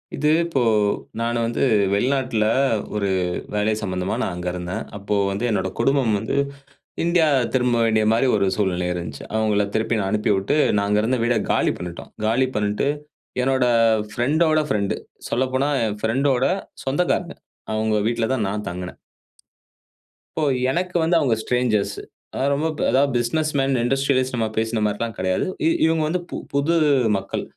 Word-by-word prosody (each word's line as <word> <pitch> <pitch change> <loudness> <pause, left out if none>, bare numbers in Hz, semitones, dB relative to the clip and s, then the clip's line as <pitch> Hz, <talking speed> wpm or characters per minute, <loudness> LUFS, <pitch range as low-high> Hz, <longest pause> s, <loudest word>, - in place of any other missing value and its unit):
இது 150 +2 +1
இப்போ 165 -6 -1 0.6
நானு 120 +1 -1
வந்து 115 - -1 0.3
வெளிநாட்டுல 125 0 +1 0.5
ஒரு 100 -2 0 0.4
வேலை 105 +1 +1
சம்மந்தமா 90 -2 -2
நான் 90 - -2
அங்க 90 0 -5
இருந்தேன். 90 +1 -4
அப்போ 105 +1 -2 0.2
வந்து 100 +5 -2
என்னோட 95 -3 0
குடும்பம் 130 -2 +2
வந்து 110 - -3 0.7
இந்தியா 170 -2 +3 0.3
திரும்ப 125 -2 +2
வேண்டிய 110 -1 +2
மாரி 120 +4 +2
ஒரு 100 -1 +1
சூழ்நிலை 90 -3 0
இருந்துச்சு. 85 -5 -6
அவங்கள 105 -2 +2
திருப்பி 110 0 0
நான் 95 -1 -1
அனுப்பி 105 +1 0
விட்டு 95 +9 0 0.2
நான் 100 0 +1
அங்க 105 +1 +3
இருந்த 125 +3 +1
வீட 120 -1 +2 0.2
காலி - - +2
பண்ணிட்டோம். 90 -1 -8 0.2
காலி 125 +4 +2
பண்ணிட்டு 105 +5 0 0.5
என்னோட 130 0 +2 0.5
ஃப்ரெண்டோட 155 +5 +2
ஃப்ரெண்ட். 100 -2 0 0.3
சொல்லப்போனா 130 +3 0
"என் 105 -1 -2
ஃப்ரெண்டோட 130 +3 +1 0.4
சொந்தக்காரங்க" 175 +5 0 0.4
அவங்க 110 0 0
வீட்ல 115 -1 0
தான் 110 -6 0
நான் 105 +1 -4
தங்கினேன் 90 +1 -7 1.4
இப்போ 160 - -1 0.3
எனக்கு 180 +3 -2
வந்து 165 +2 +2
அவங்க 130 -7 +2
ஸ்ட்ரேஞ்சர்ஸ். 125 -5 0 0.4
அதாவது 140 +2 0
ரொம்ப 150 +3 0 0.2
அதாவது 135 +2 +3
பிசினஸ் 155 +6 0
மேன், 135 0 +1
இண்டஸ்ட்ரியல்ஸ் 130 0 +1
நம்ம 115 -2 0
பேசின 110 0 0
மாதிரி 105 0 -1
எல்லாம் 115 -2 -3
கிடையாது. 95 0 0 0.4
இவங்க 160 0 +2
வந்து 175 +4 0 0.3
புது 140 +4 +2 0.4
மக்கள். 95 0 -4
115 Hz, 150 wpm, -22 LUFS, 105-135 Hz, 1.4 s, இந்தியா